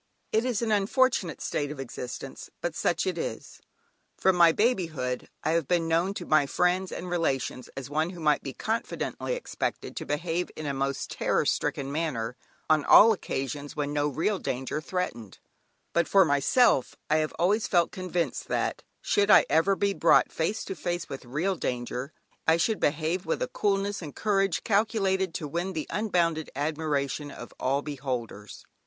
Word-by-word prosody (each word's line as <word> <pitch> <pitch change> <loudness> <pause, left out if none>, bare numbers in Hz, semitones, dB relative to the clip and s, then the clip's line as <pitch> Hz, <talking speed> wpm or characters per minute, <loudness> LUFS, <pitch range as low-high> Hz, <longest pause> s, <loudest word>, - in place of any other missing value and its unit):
It 220 +2 +2
is 240 -3 0
an 225 - 0
unfortunate 210 - +2
state 145 -1 -2
of 150 -2 -7
existence, 130 +1 -7
but 175 - -2
such 170 +2 0
it 180 -3 -1
is. - - -6 0.6
From 190 -1 +3
my 170 -1 +7
babyhood 160 - 0
I 155 - +1
have 165 -4 +1
been 170 -2 +1
known 170 +4 +1
to - - -5
my 155 -2 +3
friends 180 +5 +1
and 180 - -5
relations 140 -7 -1
as 135 - -5
one 155 +3 0
who 180 -1 -9
might 150 -2 +2
be 135 - -5
confidently 225 - -3
expected - - -4
to - - -4
behave 165 +4 -1
in 155 - -6
a 140 - -1
most 135 0 -2
terror - - +1
stricken 135 0 -1
manner 130 -7 -2 0.3
on 155 -2 +3
all 225 +8 +8
occasions 145 - -4
when 145 -1 -2
no 145 0 +1
real 165 +8 0
danger 130 +4 -3
threatened; 155 - -4 0.6
but 170 - +2
for 195 -2 +6
myself, 145 - +3
I 155 - +3
have 155 0 -1
always 205 +6 +2
felt 175 -2 +2
convinced 180 -2 -2
that - - -1 0.2
should 205 0 +2
I - - +8
ever 165 +6 +4
be 200 +1 +1
brought 170 - +4
face 200 +7 -1
to - - -4
face 175 -1 -3
with 135 -2 -7
real 160 +10 -1
danger, 125 -1 -3 0.4
I 160 +1 +5
should 215 +5 +1
behave 160 +5 0
with - - 0
a - - -1
coolness 200 - 0
and 150 -4 -8
courage 195 -4 +1
calculated 195 -4 +1
to 150 - -3
win 175 +5 -3
the 155 -3 -3
unbounded 170 -7 0
admiration 145 -1 -1
of 120 - -10
all 140 +2 0
beholders. 125 -8 -5
165 Hz, 175 wpm, -27 LUFS, 145-190 Hz, 0.6 s, all